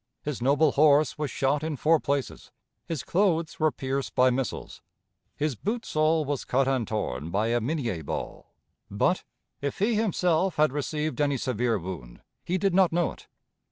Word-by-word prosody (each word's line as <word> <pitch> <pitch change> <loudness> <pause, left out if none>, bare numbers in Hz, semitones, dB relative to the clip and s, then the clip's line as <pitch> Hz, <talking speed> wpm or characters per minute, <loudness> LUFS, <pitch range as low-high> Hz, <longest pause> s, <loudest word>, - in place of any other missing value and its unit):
His 150 -4 -4
noble 140 +4 +3
horse 150 +1 +4
was 150 -2 -1
shot 135 +3 0
in 155 -1 -2
four 155 +4 +3
places; 140 -2 -3 0.4
his 160 -6 -3
clothes 170 -4 +1
were 155 0 +3
pierced 135 0 -3
by 130 0 +5
missiles; 125 -2 -4 0.5
his 150 -1 -1
boot 220 - -3
sole 155 0 +2
was 140 -1 -2
cut 130 +1 +1
and 130 -5 0
torn 80 - -3
by 105 +6 0
a 120 0 +1
Minie 120 - -2
ball; 70 - -6 0.3
but, - - +1 0.4
if 140 0 -3
he 215 +4 +2
himself 185 -4 +1
had 155 -2 +3
received 150 +1 -2
any 140 -2 +2
severe 120 -2 0
wound, 80 -10 -8 0.2
he 180 - -1
did 195 -1 +1
not 185 -1 +4
know 175 0 +1
it. - - -15
145 Hz, 170 wpm, -27 LUFS, 125-160 Hz, 0.5 s, by